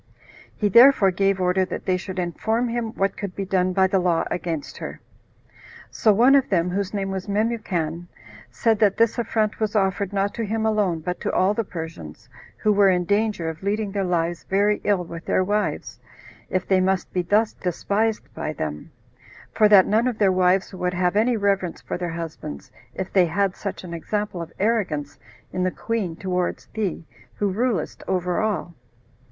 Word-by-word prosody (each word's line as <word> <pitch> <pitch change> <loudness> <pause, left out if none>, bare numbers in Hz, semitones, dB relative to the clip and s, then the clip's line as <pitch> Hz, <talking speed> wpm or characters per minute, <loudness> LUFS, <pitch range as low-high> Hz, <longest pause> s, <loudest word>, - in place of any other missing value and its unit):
He 210 - +1
therefore 235 -2 +7
gave 195 +1 +1
order 180 +1 +2
that 185 - -5
they 185 - +2
should 190 +1 -6
inform 220 +7 -1
him 230 -1 -2
what 195 0 0
could 200 -3 -6
be 195 - -3
done 185 -1 +1
by 190 +1 +3
the 190 0 +2
law 175 -2 +2
against 165 -4 -4
her. - - -7 0.9
So 220 - +3
one 240 +7 +5
of 275 -2 +4
them, 180 -2 +1
whose 200 +1 -2
name 195 -2 -2
was 190 0 -4
Memucan, 195 -6 -1 0.4
said 215 - +1
that 205 -3 +3
this 230 +1 +2
affront 220 -2 0
was 215 -1 -1
offered 195 -1 +1
not 200 0 0
to 230 - -3
him 220 +1 -1
alone, 205 -7 +1
but 180 +3 -4
to - - -1
all 190 +2 +2
the 230 - -1
Persians, 160 - -8 0.3
who 215 - +2
were 200 -1 +5
in 180 -1 +1
danger 205 -3 0
of 160 0 -5
leading 205 +1 -1
their 200 0 -1
lives 175 -1 -1
very 205 +2 +1
ill 200 -3 +1
with 170 0 -8
their 185 - +2
wives, 205 +2 -2 0.5
if 185 0 -1
they 190 -1 +3
must 190 -1 0
be 180 - +1
thus 210 +5 +2
despised 205 +5 -1
by 155 - -4
them; 75 - -5 0.6
for 215 -1 +4
that 195 -3 +8
none 225 +4 +2
of 245 -4 -2
their 200 -3 +4
wives 185 +1 +2
would 180 -1 -2
have 180 +1 +1
any 230 +3 +3
reverence 195 -4 0
for - - -5
their 175 -1 -2
husbands, 160 - -7 0.2
if 190 - -5
they, 185 -3 +5
"had 195 +3 0
such 200 -2 -5
an 175 -2 -7
example 205 +2 -3
of 165 - -7
arrogance 185 -10 -1 0.3
in 185 - -2
the 185 - +2
queen 200 -4 -3
towards 180 -1 -2
thee, 200 -6 -3 0.3
who 205 -2 0
rulest 230 +2 -1
over 180 -1 0
all." 210 -5 -2
195 Hz, 190 wpm, -23 LUFS, 180-210 Hz, 0.9 s, that